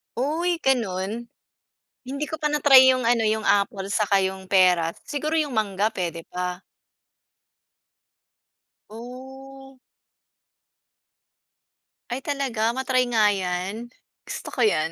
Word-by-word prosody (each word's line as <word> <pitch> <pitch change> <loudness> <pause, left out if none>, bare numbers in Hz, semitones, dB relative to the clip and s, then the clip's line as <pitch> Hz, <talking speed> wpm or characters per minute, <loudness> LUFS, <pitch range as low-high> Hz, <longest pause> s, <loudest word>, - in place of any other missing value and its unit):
Uy! 320 +8 0
Gano'n? 225 -3 -1 0.8
Hindi 275 +3 -4
ko 315 - -4
pa 300 -1 -2
na-try 270 -3 +7
yung 255 -2 0
ano, 235 -2 +2
yung 220 0 0
apple, 200 -1 +1
saka 200 -1 +2
yung 190 0 -3
peras, 180 -3 +2
siguro 305 +2 -1
yung 290 -6 -3
mangga, 205 -1 +1
puwede 175 -6 -4
pa. 180 0 -4 2.3
Oh. 265 +3 -11 2.3
Ay, 255 +2 -4
talaga 255 -6 -1
ma-try 255 0 +1
nga 220 -3 +4
yan, 190 +5 -4 0.3
gusto - - -7
ko 250 - +1
yan. 160 -7 +2
230 Hz, 110 wpm, -24 LUFS, 195-265 Hz, 2.3 s, na-try